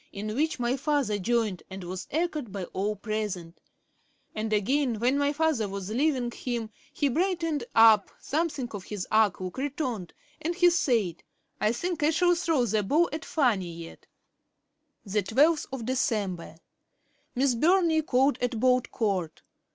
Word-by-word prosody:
in 215 +2 -5
which 300 +3 0
my 240 +1 +1
father 275 -7 0
joined, 215 -2 0
and 190 0 -7
was 180 +1 -6
echoed 305 - -2
by 195 -1 -4
all 205 +3 -1
present; 205 -5 -4 0.7
and 215 0 -3
again, 240 +4 +1
when 250 +4 +2
my 285 0 +2
father 295 -8 0
was 195 0 -5
leaving 255 -1 +1
him, 235 -3 -4 0.2
he 290 - 0
brightened 330 -1 0
up, 220 -3 +6
something 295 -4 -2
of 200 -3 -7
his 205 -4 -5
arch 215 -3 +4
look 185 +6 -5
returned, 260 - -3 0.3
and 340 +3 -2
he 355 -1 +5
said: 235 - +1 0.4
"I 210 - +2
think 345 +7 -3
I 295 - +4
shall 350 +2 +3
throw 325 -7 +1
the 215 -1 +1
ball 300 - +2
at 310 - -4
Fanny 220 - +1
yet."' 165 0 -11 1.0
'Dec. 200 -1 -1
12. 235 - 0 0.8
[Miss 260 +1 +2
Burney 330 +4 +3
called 265 -2 +2
at 245 -2 -1
Bolt 250 0 +2
court. 190 -8 -2
240 Hz, 150 wpm, -27 LUFS, 205-295 Hz, 1.0 s, up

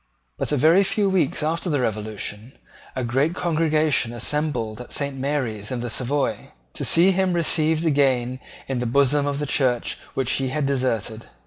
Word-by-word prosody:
But, - - -3
a 150 - +2
very 160 +8 +5
few 200 0 +1
weeks 170 -6 +1
after 165 +3 0
the 145 -3 +1
Revolution, 110 0 -4 0.4
a 130 - -2
great 135 +8 0
congregation 155 -7 +1
assembled 120 -3 -2
at 125 - -11
Saint 140 -1 -1
Mary's 130 -6 -2
in 125 -2 -3
the 120 -1 -4
Savoy, 135 +4 -2 0.2
to - - -5
see 175 +3 +5
him 190 -1 +1
received 160 -1 +2
again 130 -4 +2 0.3
into 125 -2 -2
the - - -4
bosom 140 +2 +3
of 140 -1 -1
the 150 - -2
Church 130 -4 0 0.2
which 130 -2 0
he 135 - 0
had 150 +2 -1
deserted. 115 -5 -1
140 Hz, 175 wpm, -23 LUFS, 120-155 Hz, 0.4 s, very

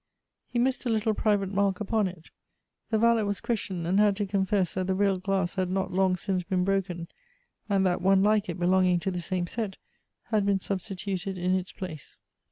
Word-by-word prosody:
He 245 - -4
missed 255 +2 +1
a - - +1
little 220 -1 +1
private 205 -2 +1
mark 195 -1 +2
ujjon 210 0 0
it. 175 -3 -10 0.6
The 220 - +2
valet 230 0 +4
was 205 -2 -1
questioned, 190 -7 -3
and 185 +4 +2
had 210 -1 +4
to 205 - 0
confess 190 -2 0
that 185 0 -2
the 190 - +1
real 200 -1 +2
glass 190 -2 0
had 185 -2 -1
not 190 0 -1
long 190 0 +3
since 185 0 -1
been 180 0 0
bro 195 +1 +2
ken, 175 -3 -7 0.6
and 195 -1 +2
that 180 -1 +1
one 195 +1 +4
like 210 0 +2
it - - -3
belonging 180 0 +3
to 190 +2 -1
the 180 -1 -3
same 180 0 -1
set 205 +1 -4 0.5
had 215 -2 +3
been 200 -1 +2
substituted 195 0 -4
in 180 +1 0
its 185 -1 -1
place. 160 -6 -8
190 Hz, 205 wpm, -27 LUFS, 185-205 Hz, 0.6 s, valet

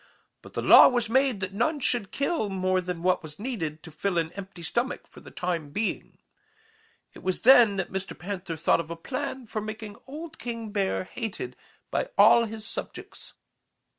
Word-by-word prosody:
But - - -14
the - - -3
law - - +10
was 240 -3 0
made 260 -5 +2
that 185 0 -3
none 290 +9 0
should 240 -6 +1
kill 280 -6 -1
more 185 -1 +1
than 180 -1 -5
was 165 -4 0
needed 175 - -4
to 160 - -10
fill 175 +4 -2
an 165 -1 0
empty 195 -3 -9
stomach 240 - -2
for - - -15
the - - -13
time 170 -4 -3
being. 210 +9 -3 1.0
It - - -13
was 185 -1 -1
then 240 -5 +7
that 190 -2 -3
Mr. 190 +1 -4
Panther 180 -2 -5
thought 165 - +3
of 165 -1 -5
a 170 - -4
plan 260 +7 -5
for 215 -1 -4
making 215 -1 -7
old 310 +3 -8
King 230 -3 -5
Bear 195 -3 0
hated 225 - -5 0.4
by - - -1
all 235 -1 +7
his 220 0 -8
subjects. - - -8
205 Hz, 180 wpm, -27 LUFS, 180-240 Hz, 1.0 s, law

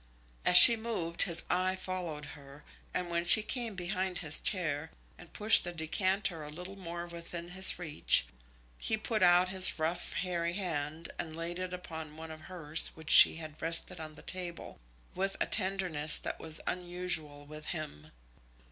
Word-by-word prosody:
As 180 - +7
she 235 - +12
moved 215 -7 -4
his 170 -3 +1
eye 185 +1 -1
followed 180 -5 -6
her, 140 0 -15 0.3
and 180 -1 -4
when 170 0 -1
she 210 +5 +5
came 235 -3 -4
behind 185 0 -4
his 155 -3 0
chair, 160 -5 0 0.3
and 175 - -16
pushed 215 +1 +6
the 175 - -4
decanter 175 +1 -2
a 150 - -9
little 180 +5 -10
more 175 -2 -8
within 170 0 -9
his 190 +1 +1
reach, 160 -4 +2 0.5
he 220 - -1
put 220 -1 -3
out 180 0 +4
his 185 0 -1
rough, 165 +2 -3
hairy 175 -2 -3
hand, 165 -4 -5
and 160 -2 -6
laid 170 +2 -5
it 185 -1 -5
upon 160 -4 -9
one 160 0 -9
of 155 0 -11
hers 160 -3 -4
which 160 0 -6
she - - +9
had 155 -1 -10
rested 165 +2 -3
on 155 -1 -9
the - - -14
table, 180 -2 -7 0.3
with 195 +1 -3
a - - 0
tenderness 185 -7 +1
that - - -5
was 160 -1 -6
unusual 175 -5 -2
with 155 +1 -11
him. 150 - -7
175 Hz, 170 wpm, -30 LUFS, 160-185 Hz, 0.5 s, she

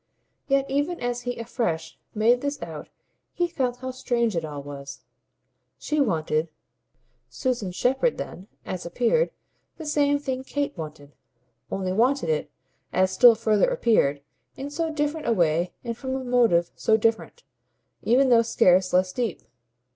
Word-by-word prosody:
Yet 275 0 +2
even 290 +6 -1
as 245 0 -2
he 245 - -3
afresh 220 -9 -3 0.2
made 235 +3 +3
this 285 0 -3
out - - -8 0.4
he 350 -1 0
felt 255 -7 -2
how 260 0 -4
strange 235 -4 -1
it 165 - -1
all 145 -2 -6
was. 140 -1 -9 0.7
She 300 -1 -1
wanted, 160 - 0 0.8
Susan 240 -8 -2
Shepherd 265 - +1
then, 185 - -7 0.2
as 185 -1 -4
appeared, 250 - +1 0.5
the 320 - -8
same 290 -1 +2
thing 265 -2 -4
Kate 285 +1 -3
wanted, 150 -3 -9 0.6
only 185 -1 -2
wanted 245 - +2
it, 155 -1 0 0.4
as 185 +1 +2
still 240 +1 +7
further 220 - +2
appeared, 215 - +2 0.3
in 280 +2 -6
so 325 +2 -1
different 300 +1 -2
a 235 - +3
way 170 -2 +1
and 235 -2 -3
from 260 +2 -4
a 265 - -3
motive 230 -9 +3
so 220 - +3
different, 225 - -1 0.6
even 260 +3 +3
though 235 -2 +6
scarce 185 -5 +3
less 185 0 +2
deep. 235 -7 -2
235 Hz, 150 wpm, -25 LUFS, 180-275 Hz, 0.8 s, still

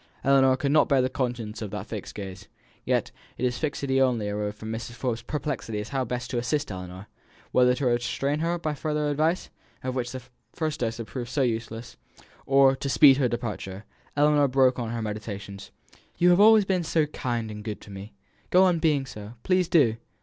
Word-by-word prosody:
Ellinor 135 -1 +5
could 140 +1 0
not 155 - +4
bear 140 -2 +4
the 130 - -1
consciousness 120 -5 -3
of 105 - -4
that 100 0 -5
fixed 110 -2 -7
gaze. 95 -1 -8 0.4
Yet - - 0 0.3
its 125 -1 -1
fixity 140 -3 0
only 120 -6 +1
arose 105 0 -3
from 110 +1 -7
Mrs. 115 +1 -5
Forbes' 120 -2 -3
perplexity 145 -8 -3
as 105 - -6
to - - -12
how 135 -1 0
best 125 +1 -4
to 120 - 0
assist 145 +1 -1
Ellinor, 90 +1 -8 0.5
whether 125 0 +4
to 135 - -2
restrain 125 +4 0
her 170 +2 0
by 155 -3 -2
further 150 0 -1
advice 160 +5 0 0.3
of 130 0 -2
which 125 -1 -3
the 130 -1 -7 0.3
first 155 -2 -2
dose 115 -1 -2
had 115 - -5
proved 120 0 -6
so 140 +2 +1
useless 115 -1 -3 0.5
or 135 0 +5
to 140 - -3
speed 135 +2 +7
her 130 -3 +2
departure. 105 -4 -5 0.3
Ellinor 145 -1 +4
broke 130 -1 +3
on 115 -2 -3
her 115 -1 -3
meditations: 100 -2 -6 0.5
"You 180 +1 +5
have 175 - +4
always 215 -1 +7
been 185 -2 0
so 160 -1 +1
kind 120 -7 -3
and 105 0 -8
good 105 -1 -5
to 105 - -12
me, 100 +2 -9 0.4
go 185 +1 +6
on 180 -3 +3
being 150 -4 +2
so 105 -3 -9
please, 185 -2 +2
do! 130 -11 +4
125 Hz, 200 wpm, -26 LUFS, 110-145 Hz, 0.5 s, speed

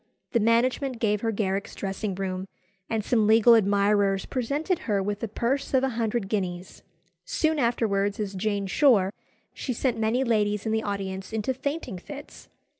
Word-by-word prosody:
The 235 - +2
management 245 +4 +2
gave 210 -2 +1
her 225 - 0
Garrick's 200 -2 -2
dressing 195 0 -3
room, 190 0 -3 0.4
and 220 -2 -1
some 220 -4 +2
legal 225 +2 +7
admirers 200 -2 +3
presented 285 +8 -1
her 205 -2 +2
with 205 +1 -2
a 230 - -1
purse 255 +6 -1
of 260 - +3
a 270 - +2
hundred 230 -3 -1
guineas. 185 -3 -3 0.4
Soon 315 - 0
afterwards, 205 -5 +1
as 205 -2 -3
Jane 200 +1 -1
Shore, 195 -3 +4 0.4
she 255 - -3
sent 240 -1 -1
many 225 +4 +1
ladies 210 -4 +1
in 220 - 0
the 220 0 +1
audience 195 -2 -4
into 220 +4 -1
fainting 270 - -4
fits. 285 +9 -11
215 Hz, 165 wpm, -26 LUFS, 200-240 Hz, 0.4 s, legal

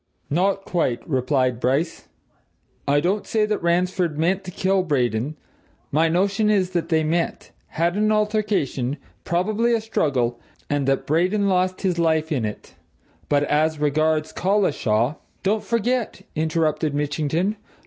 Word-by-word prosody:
"Not 195 +5 +1
quite," 130 -9 -1
replied 130 -3 +1
Bryce. 140 +7 -1 0.8
"I 145 +1 +3
don't 195 +5 0
say 215 -1 +2
that 210 0 -2
Ransford 175 -1 +1
meant 185 +5 +1
to - - -6
kill 190 +2 +1
Braden 135 -3 -1 0.5
my 160 +3 +3
notion 195 +5 +1
is 190 -3 +2
that 170 -2 -2
they 160 -2 +2
met, 165 +2 -1 0.2
had 170 +2 0
an 215 +1 +2
altercation, 210 - 0 0.3
probably 215 +7 +1
a - - +1
struggle, 130 - 0 0.3
and 145 -2 0
that 135 0 +1
Braden 185 +7 +2
lost 185 -1 +1
his 180 -3 0
life 160 -1 +1
in 130 -7 0
it. 105 - -7 0.6
But 145 0 +3
as 155 +2 +1
regards 155 +1 +1
Collishaw 150 - +1
" - - -40
"Don't 210 +3 +1
forget!" 235 +1 -1
interrupted 155 -1 0
Mitchington. 155 +7 -1
165 Hz, 140 wpm, -23 LUFS, 145-195 Hz, 0.8 s, I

